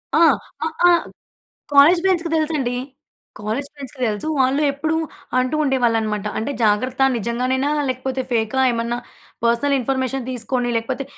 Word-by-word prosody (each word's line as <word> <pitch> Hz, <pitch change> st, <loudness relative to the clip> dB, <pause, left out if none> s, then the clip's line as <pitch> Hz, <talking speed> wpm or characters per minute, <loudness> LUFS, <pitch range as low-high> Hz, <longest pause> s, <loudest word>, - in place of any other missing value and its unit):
ఆ! -, -, +4 dB, 0.5 s
అ -, -, +1 dB, 0.2 s
ఆ! -, -, +7 dB, 0.8 s
కాలేజ్ 295 Hz, +5 st, +7 dB
ఫ్రెండ్స్‌కి 355 Hz, -3 st, +1 dB
తెలుసండి. 300 Hz, -6 st, 0 dB, 0.7 s
కాలేజ్ 220 Hz, +7 st, -3 dB
ఫ్రెండ్స్‌కి 275 Hz, -1 st, -10 dB
తెలుసు. 215 Hz, +7 st, -2 dB
వాళ్ళు 265 Hz, +3 st, +2 dB
ఎప్పుడూ 315 Hz, +3 st, -1 dB, 0.4 s
అంటూ 255 Hz, +3 st, 0 dB
ఉండేవాళ్ళనమాట, 225 Hz, -6 st, 0 dB
అంటే 225 Hz, -, -2 dB
జాగ్రత్త 250 Hz, +5 st, +1 dB
నిజంగానేనా, 255 Hz, +5 st, -1 dB, 0.2 s
లేకపోతే 260 Hz, +1 st, -2 dB
ఫేకా? 225 Hz, +2 st, 0 dB
ఏమన్నా 235 Hz, +1 st, -2 dB, 0.5 s
పర్సనల్ 235 Hz, +5 st, +2 dB
ఇన్ఫర్మేషన్ 260 Hz, 0 st, -2 dB
తీసుకొని 245 Hz, 0 st, -2 dB
లేకపోతే, 255 Hz, +4 st, -2 dB
255 Hz, 125 wpm, -21 LUFS, 235-280 Hz, 0.8 s, ఆ